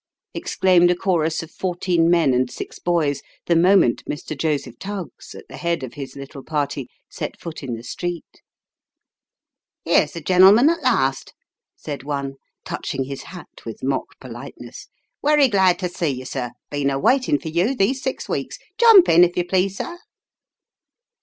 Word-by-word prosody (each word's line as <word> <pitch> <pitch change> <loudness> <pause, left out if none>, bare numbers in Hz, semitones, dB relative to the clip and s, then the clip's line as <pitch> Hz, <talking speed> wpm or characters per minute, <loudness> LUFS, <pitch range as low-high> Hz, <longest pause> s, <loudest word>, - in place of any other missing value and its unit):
" - - -67
exclaimed 180 -2 +3
a 180 - +3
chorus 165 -3 0
of 165 - -12
fourteen 175 -2 0
men 170 -6 +3
and 125 0 +1
six - - -8
boys, 160 -5 0 0.2
the 170 - +2
moment 175 -6 +4
Mr. 150 +1 -5
Joseph 150 0 -2
Tuggs, 195 - -7
at - - -12
the - - -10
head 170 -4 -2
of 130 - -7
his 140 -2 -8
little 140 0 -9
party, 145 -4 -2 0.2
set - - -6
foot 165 -2 -7
in 130 -4 -4
the 115 - -10
street. 175 +7 -6 0.7
" - - -67
Here's - - +3
the 170 - -5
gen'lm'n 190 - +6
at 335 -1 -3
last! 135 - 0 0.2
" - - -68
said 145 -2 -4
one, 140 -1 -4 0.3
touching 135 - -3
his 135 +1 -7
hat 180 -3 -12
with 115 -2 -8
mock 135 +1 -3
politeness. 120 0 -10 0.2
" - - -57
Werry 295 -1 +4
glad 190 -5 +3
to 185 - -2
see 175 -1 -3
you, 130 -2 -3
sir, 125 -2 -4 0.2
been 145 -1 0
a 135 - -1
waitin' 255 - +2
for 160 - -7
you 180 +11 +1
these 255 +5 +1
six 265 - -4
weeks. - - -3 0.2
Jump 450 -6 +8
in, 170 +2 +6
if 175 0 +1
you 175 - +1
please, 190 +2 0
sir 345 0 -5
170 Hz, 180 wpm, -21 LUFS, 140-190 Hz, 0.7 s, Jump